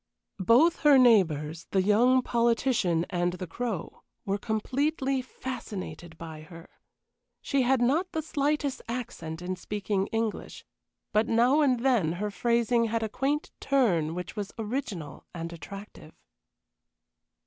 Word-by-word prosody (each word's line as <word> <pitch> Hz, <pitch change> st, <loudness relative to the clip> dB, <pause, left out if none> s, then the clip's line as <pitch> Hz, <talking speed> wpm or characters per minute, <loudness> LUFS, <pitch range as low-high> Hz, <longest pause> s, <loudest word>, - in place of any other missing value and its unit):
Both 245 Hz, -, +5 dB
her 295 Hz, -3 st, +6 dB
neighbors, 165 Hz, -, +3 dB
the 190 Hz, -1 st, +2 dB
young 245 Hz, +6 st, +4 dB
politician 230 Hz, -8 st, +1 dB
and 175 Hz, -1 st, 0 dB
the 185 Hz, 0 st, -5 dB
Crow, 195 Hz, 0 st, -5 dB, 0.2 s
were 200 Hz, 0 st, -1 dB
completely 265 Hz, +5 st, -1 dB
fascinated 190 Hz, -11 st, -7 dB
by 160 Hz, -2 st, -8 dB
her. 165 Hz, +1 st, -12 dB, 0.7 s
She 275 Hz, -2 st, 0 dB
had 255 Hz, 0 st, +3 dB
not 320 Hz, +9 st, +1 dB
the 315 Hz, -, -2 dB
slightest 290 Hz, -2 st, -1 dB
accent 175 Hz, -9 st, -5 dB
in 185 Hz, +1 st, -2 dB
speaking 200 Hz, 0 st, -2 dB
English, 225 Hz, -1 st, -3 dB, 0.5 s
but 215 Hz, +2 st, +3 dB
now 245 Hz, +6 st, +4 dB
and 255 Hz, -5 st, +2 dB
then 235 Hz, -11 st, +2 dB
her 205 Hz, +4 st, -3 dB
phrasing 235 Hz, +3 st, +2 dB
had 225 Hz, 0 st, -1 dB
a 220 Hz, -, -2 dB
quaint 280 Hz, +7 st, -1 dB
turn 180 Hz, -, +1 dB
which 180 Hz, 0 st, -6 dB
was 205 Hz, -1 st, -4 dB
original 215 Hz, -, -5 dB
and 170 Hz, 0 st, -5 dB
attractive. 195 Hz, +6 st, -10 dB
225 Hz, 130 wpm, -28 LUFS, 180-255 Hz, 0.7 s, her